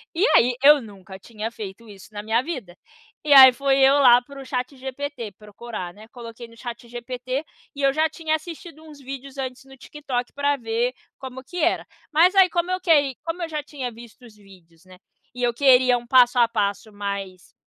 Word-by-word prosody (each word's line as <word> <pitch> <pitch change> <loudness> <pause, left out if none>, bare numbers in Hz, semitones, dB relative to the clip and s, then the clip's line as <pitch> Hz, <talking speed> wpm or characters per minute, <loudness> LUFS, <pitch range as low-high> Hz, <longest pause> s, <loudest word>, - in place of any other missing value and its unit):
E, 360 +6 +2
aí, 245 +1 +4
eu 290 0 +7
nunca 195 -3 -12
tinha 220 +2 -7
feito 215 +1 -9
isso, 200 -1 -14
na 205 0 -6
minha 225 +2 +1
vida. 255 - -7 0.5
E, 300 - -2
aí, 265 -2 +10
foi 270 +2 +1
eu, 270 0 +6
lá, 245 -3 +7
para 275 +1 -11
o - - -11
ChatGPT 260 -2 -5
procurar, 210 -3 -8
né. 215 +3 -15
Coloquei 235 -1 -10
no 230 0 -19
ChatGPT. 245 +3 -6 0.3
E 285 - -6
eu 275 - +3
já 315 +2 +1
tinha 315 0 -2
assistido 320 0 -9
uns 300 -2 -14
vídeos 275 0 -9
antes, 260 -1 -5
no 270 0 -16
TikTok, 260 -3 -5
pra 285 0 0
ver 235 +1 -2 0.3
como 260 -1 -9
que 355 - -10
era. 310 - +1 0.3
Mas, 335 +5 +4
aí, 380 -2 +6
como 350 +1 -1
eu 370 - -1
que 290 -6 +3
como 335 +2 -4
eu - - -3
já 305 -1 -3
tinha 265 -5 -6
visto 235 +2 -15
os 220 -3 -16
vídeos, 180 -5 -20
né, 185 0 -16 0.4
e 250 - -8
eu 240 -1 +1
queria 255 -1 +4
um 240 0 -10
passo 250 0 +5
a 235 - +5
passo 210 -1 -2
mais, 200 -2 -6
250 Hz, 200 wpm, -23 LUFS, 225-285 Hz, 0.5 s, aí